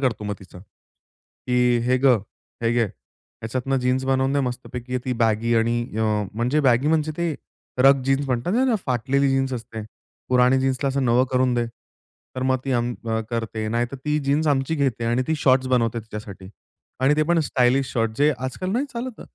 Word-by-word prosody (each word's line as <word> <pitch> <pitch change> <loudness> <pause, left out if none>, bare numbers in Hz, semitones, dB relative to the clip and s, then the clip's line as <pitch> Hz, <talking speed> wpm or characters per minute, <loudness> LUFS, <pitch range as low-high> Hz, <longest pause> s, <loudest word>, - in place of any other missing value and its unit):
करतो 120 -6 -1
मग 105 - -2
तिचा. 95 -2 -14 0.9
की 125 -1 +3
"हे 125 +1 +3
गं, 130 -4 +4 0.4
हे 115 - +2
घे, 120 -1 +2
ह्याच्यातनं 115 - -5
जीन्स 130 +1 0
बनवून 135 0 +1
दे 140 - +2
मस्तपैकी, 125 0 -4
ती 130 - -1
बॅगी 115 +1 +2
आणि 115 +1 +2 0.2
अ, - - +1 0.3
म्हणजे 125 +7 +1
बॅगी 125 +4 +3
म्हणजे 155 -1 +1
ते 170 -2 -1 0.4
रग 135 +1 +5
जीन्स 135 +1 +1
म्हणतात 125 +6 -1
ना, 245 - +2
फाटलेली 130 +3 +1
जीन्स 135 0 +1
असते, 115 -2 -6 0.5
पुरानी 125 +1 +4
जीन्सला 135 +1 0
असं 135 0 0
नवं 120 +2 +4
करून 125 -1 +2
दे." 120 -1 0 0.7
तर 130 - -2
मग 130 0 +2
ती 135 - -1
अं, 120 0 0 0.4
करते. 115 -2 -3
नाहीतर 120 +4 -1
ती 150 0 +1
जीन्स 150 +3 +2
आमची 135 +3 0
घेते 135 -6 -1
आणि 120 +2 +1
ती 160 - +2
शॉर्ट्स 130 -1 +4
बनवते 120 -2 +1
तिच्यासाठी 105 -3 -9 0.5
आणि 135 +3 +4
ते 155 - +3
पण 170 -1 +3
स्टायलिश 130 +1 +2
शॉर्ट्स, 115 -2 -1
जे 150 +1 +4
आजकाल 130 +9 -4
नाही 245 +7 0
चालत. 240 0 -6
130 Hz, 180 wpm, -23 LUFS, 120-135 Hz, 0.9 s, रग